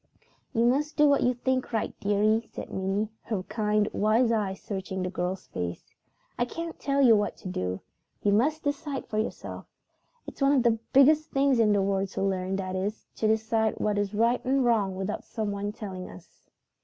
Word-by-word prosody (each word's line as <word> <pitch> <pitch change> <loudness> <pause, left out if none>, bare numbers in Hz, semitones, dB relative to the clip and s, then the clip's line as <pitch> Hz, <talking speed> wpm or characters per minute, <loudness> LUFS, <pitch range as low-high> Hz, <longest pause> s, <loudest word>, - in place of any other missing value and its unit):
"You 230 -2 +2
must 285 +5 +1
do 300 -1 +6
what 285 -1 +4
you 250 0 +2
think 255 +1 -1
right, 225 -2 -1
dearie," 215 +3 +1
said - - -8
Minnie, 195 +3 -1
her 210 -5 -3
kind, 210 0 0
wise 225 +3 +3
eyes 200 -4 -1
searching 190 -2 -4
the 180 - -3
girl's 185 0 -3
face. 85 -1 -6 0.5
"I 240 - +3
can't 330 +5 -6
tell 275 0 +1
you 235 -4 +7
what 205 0 0
to - - -9
do. 90 - -3 0.4
You 205 - +3
must 295 +10 +2
decide 285 -1 -3
for 215 -2 -2
yourself. 215 - -5 0.6
It's - - -10
one 275 +1 +5
of 265 -4 +3
the 230 -2 +3
biggest 305 +3 +5
things 275 -3 +2
in 215 -2 +4
the 200 -1 +3
world 195 0 0
to - - -2
learn; 190 -1 -1
that 185 -1 -3
is, 200 +3 -3
to 220 - +1
decide 220 0 +1
what 210 -1 +1
is 205 0 -2
right 230 +3 +2
and 265 0 +2
wrong 210 -5 +2
without 190 +2 -3
someone 205 -2 -3
telling 195 -4 -7
us." 90 - -16
215 Hz, 190 wpm, -27 LUFS, 195-250 Hz, 0.6 s, you